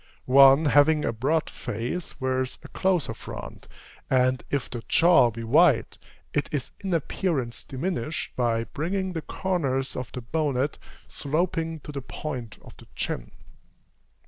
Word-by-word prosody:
One 135 +3 +7
having 150 +1 +4
a - - 0
broad 145 +8 0
face, 120 - -5
wears 130 0 -1
a - - -11
closer 185 -5 0
front; - - -9 0.4
and, 130 0 +2
if 135 -7 -1
the 120 +2 -6
jaw 165 -8 +6
be 115 0 -7
wide, 140 +2 +3 0.3
it 145 - 0
is 145 -5 -3
in 195 - -4
appearance 150 -6 -1
diminished, 150 0 -3
by 115 -2 +1
bringing 185 +8 -3
the 165 - -3
corners 140 -9 -1
of 125 -2 -5
the 125 - -6
bonnet 140 +1 -1 0.3
sloping 160 +1 -2
to 150 - -8
the 140 -1 -5
point 125 -5 -6
of - - -14
the - - -15
chin. - - -3
140 Hz, 145 wpm, -26 LUFS, 125-160 Hz, 0.4 s, One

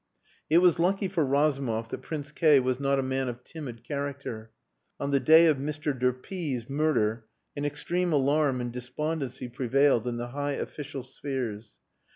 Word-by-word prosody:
It 160 - +5
was 175 -2 +5
lucky 195 +3 +2
for 180 -4 0
Razumov 135 -5 +1
that - - -5
Prince 150 -2 -5
K 150 -2 +5
was 130 0 0
not 140 0 +1
a 135 - +1
man 130 0 -1
of 125 +1 -6
timid 125 -8 -8
character. 140 -6 -5 0.5
On 140 0 -2
the 140 - +4
day 160 +4 +7
of 155 -4 +4
Mr. 150 +2 -2
de 125 0 +2
P 145 +2 -4
's 115 0 -9
murder 120 -7 0 0.3
an 145 0 -3
extreme 175 +4 -1
alarm 140 -2 +2
and 120 -1 -4
despondency 130 +1 -3
prevailed 125 0 +2
in 120 -1 -2
the 120 +1 -4
high 145 +2 -2
official 140 -1 -5
spheres. 125 -5 -5
140 Hz, 175 wpm, -28 LUFS, 125-150 Hz, 0.5 s, day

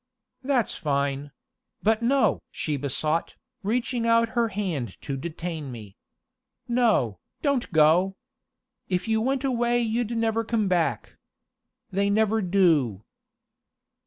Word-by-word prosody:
"That's 260 -3 +1
fine 140 -1 -1 0.5
but 220 +2 +3
no!" 265 +3 +2
she 150 - -3
besought, 150 +4 -1 0.3
reaching 230 +2 -1
out 230 0 +4
her 235 0 +1
hand 175 - -3
to 140 - -3
detain 160 0 -5
me. 105 -5 -10 0.7
"No, 225 - +2 0.2
don't 280 -5 0
go! 170 +4 +4 0.7
If 180 0 -1
you 220 0 +2
went 265 +3 0
away 240 -2 +1
you'd 235 0 -1
never 225 0 +1
come 225 -2 0
back. 165 - 0 0.7
They 200 +2 +1
never 220 +1 +2
do." 165 - +2
200 Hz, 115 wpm, -26 LUFS, 150-230 Hz, 0.7 s, out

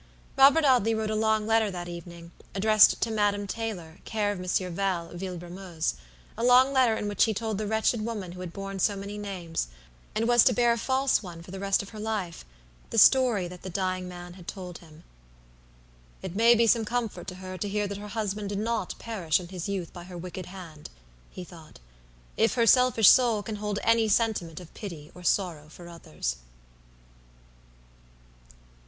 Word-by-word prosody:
Robert 280 +4 +6
Audley 240 -5 +4
wrote 220 -1 -2
a - - -1
long 220 0 +1
letter 225 -1 +2
that 175 -2 -6
evening, 170 0 -9 0.2
addressed 215 +2 +5
to 230 - -1
Madame 205 -1 +1
Taylor, 195 -7 -5
care 210 -2 -1
of 200 - -5
Monsieur 180 0 -1
Val, 180 -2 -2
Villebrumeuse; 175 - -4 0.4
a 230 - -4
long 250 +2 +5
letter 255 -4 +4
in 210 - -3
which 205 - +3
he 220 -2 -1
told 220 -1 -2
the 215 - -2
wretched 220 +1 +1
woman 210 -6 -4
who 180 - -10
had 180 -2 -6
borne 195 +1 -6
so 205 +2 +2
many 200 +1 -6
names, 180 - -4 0.5
and 225 +2 0
was 240 -1 +6
to - - +4
bear 240 -1 +3
a - - -3
false 265 +3 +1
one 170 -4 -9
for 180 - -12
the 195 - -7
rest 195 0 +1
of 200 - -11
her 215 - -10
life, 210 -6 -3 0.5
the - - -4
story 235 -5 +5
that 180 0 -11
the 190 - -7
dying 185 0 -2
man 175 -1 -9
had 180 -2 -14
told 180 -3 -7
him. 160 -2 -17 1.2
"It 170 - -6
may 230 +3 +6
be 230 0 +4
some 230 0 +3
comfort 235 -2 -3
to 180 - -6
her 185 0 -8
to 205 - -2
hear 210 +1 -1
that 200 0 -6
her 210 - -8
husband 210 -1 -3
did 200 - -3
not 225 +1 -2
perish 190 -9 -1
in 175 -1 -9
his 185 0 -5
youth 190 -4 -4
by 175 -1 -9
her 180 -1 -9
wicked 180 +1 -7
hand," 170 -5 -10 0.4
he 185 - -8
thought, 165 -3 -14 0.6
"if 225 -1 +2
her 235 -2 +3
selfish 250 -3 +5
soul 235 -5 +5
can 215 0 -5
hold 210 0 -3
any 230 -1 +3
sentiment 205 -7 0
of 175 -2 -13
pity 165 -8 -8
or 180 - -12
sorrow 170 -4 -1
for 170 +2 -12
others." 75 - -5
200 Hz, 195 wpm, -27 LUFS, 180-220 Hz, 1.2 s, Robert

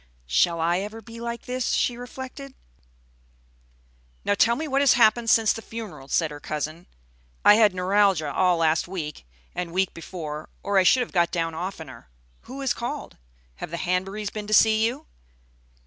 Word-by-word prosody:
"Shall 165 - +2
I 170 +2 +1
ever 210 +3 -6
be 230 +1 -11
like 235 0 -5
this?" 250 0 -2
she 245 - +1
reflected. 260 +2 -9 1.7
"Now - - +3
tell 230 +3 +3
me 310 +5 -4
what 275 -1 +1
has 280 - +6
happened 230 0 +4
since 220 -1 +4
the 225 - -7
funeral," 220 -12 -8
said 160 +2 +1
her 145 - -8
cousin. 155 +4 -5 0.6
"I - - +9
had 210 -3 +4
neuralgia 185 -5 +2
all 180 -2 +3
last 160 0 +2
week 155 - -6 0.3
and 180 -1 -4
week 190 +2 0
before, 155 -3 -7
or 200 -1 +2
I - - +4
should 250 +7 +5
have 245 - -3
got 175 -2 +2
down 165 -2 -2
oftener. 160 - -7 0.4
Who 270 +2 -8
has 265 -2 +1
called? 240 0 -6 0.4
Have - - -6
the 170 - -4
Hanburys 195 +4 -2
been 210 -1 -5
to 215 - +3
see 220 0 +5
you?" 275 +7 -6
195 Hz, 175 wpm, -25 LUFS, 165-230 Hz, 1.7 s, I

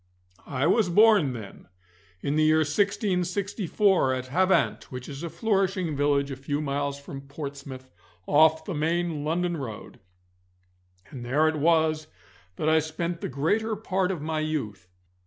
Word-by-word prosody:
I 135 0 -1
was 185 +3 +3
born 205 - +5
then 110 -5 -10 0.5
in 140 +1 -1
the 155 - +3
year 155 0 +4
1664, 190 - +1
at 130 0 -4
Havant, 185 +6 +2
which 125 -1 -7
is 140 -1 -7
a 170 - -4
flourishing 190 -2 0
village 140 0 +1
a - - -3
few 140 +2 -3
miles 140 -1 -2
from 140 -1 -9
Portsmouth 140 -2 -8 0.3
off 160 +1 +4
the 190 - -4
main 165 0 -1
London 170 +2 -1
road, 115 -7 -8 1.1
and 125 -3 -8
there 145 +6 +2
it 155 0 0
was 155 0 +2 0.5
that 150 - -2
I 160 0 +5
spent 165 +2 -4
the - - -3
greater 205 - 0
part 190 -3 -1
of 175 -6 -3
my 160 0 -2
youth. 115 - -3
155 Hz, 150 wpm, -26 LUFS, 140-180 Hz, 1.1 s, born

